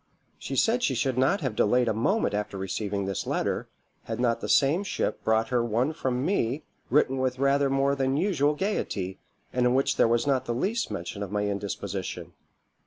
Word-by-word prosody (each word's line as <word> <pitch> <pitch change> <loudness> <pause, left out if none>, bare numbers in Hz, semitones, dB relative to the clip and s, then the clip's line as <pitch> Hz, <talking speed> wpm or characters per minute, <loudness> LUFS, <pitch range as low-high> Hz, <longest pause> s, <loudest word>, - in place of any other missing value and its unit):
She - - -5
said 235 +2 +3
she 135 - +1
should 130 +1 0
not 135 +10 +2
have 130 -7 -2
delayed 125 +4 +3
a - - +2
moment 155 - +1
after 105 -1 -2
receiving 100 +1 -2
this 95 -1 -3
letter, - - -1 0.4
had - - -4
not 115 -2 +1
the - - -4
same 150 +8 +4
ship 200 - -2
brought 110 0 +2
her 125 -2 +2
one 120 +6 0
from 130 -3 -1
me 150 - 0 0.3
written 135 0 +3
with 130 -1 0
rather 140 +1 +2
more 135 +1 +2
than 135 0 0
usual 150 -5 +2
gaiety, 100 - -2 0.3
and 125 - +1
in 125 - +2
which 135 - +1
there - - +5
was 115 0 +2
not 135 -2 +1
the 120 - -2
least 215 - -1
mention 105 - -5
of 100 -2 -4
my 105 0 0
indisposition. 100 -1 -4
125 Hz, 195 wpm, -27 LUFS, 110-140 Hz, 0.4 s, there